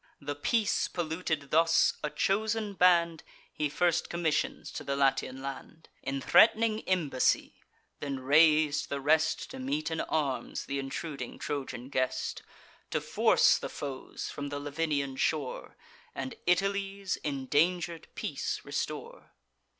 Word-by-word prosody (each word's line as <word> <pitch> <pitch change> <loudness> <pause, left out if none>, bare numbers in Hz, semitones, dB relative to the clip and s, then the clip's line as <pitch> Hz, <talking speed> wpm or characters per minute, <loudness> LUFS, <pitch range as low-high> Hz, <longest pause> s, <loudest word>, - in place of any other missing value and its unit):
The 145 0 -4
peace 205 +9 +1
polluted 160 -4 -3
thus, 165 +1 +4
a 150 - -1
chosen 215 +4 0
band 170 -3 +4 0.3
He 150 -1 -1
first 170 +2 +1
commissions 165 -3 -1
to - - -6
the 140 - -2
Latian 135 -1 +1
land, 140 +4 -8
In 135 +1 -3
threat'ning 220 - +5
embassy; 160 -9 +1 0.4
then 140 -2 -3
rais'd 150 +2 +4
the 140 - -2
rest, 155 +3 +2
To 265 - -8
meet 280 - -2
in 160 - -1
arms 140 -6 -2
th' - - -12
intruding 135 -1 -4
Trojan 130 -3 -4
guest, 130 -2 -1 0.5
To - - 0
force - - +4
the - - -5
foes 135 -2 -6
from 145 0 -5
the 145 0 -4
Lavinian 145 -2 -2
shore, 145 -3 -2 0.4
And 130 0 -4
Italy's 195 +1 0
indanger'd 160 +5 0
peace - - -3
restore. - - -5
155 Hz, 125 wpm, -30 LUFS, 140-180 Hz, 0.5 s, threat'ning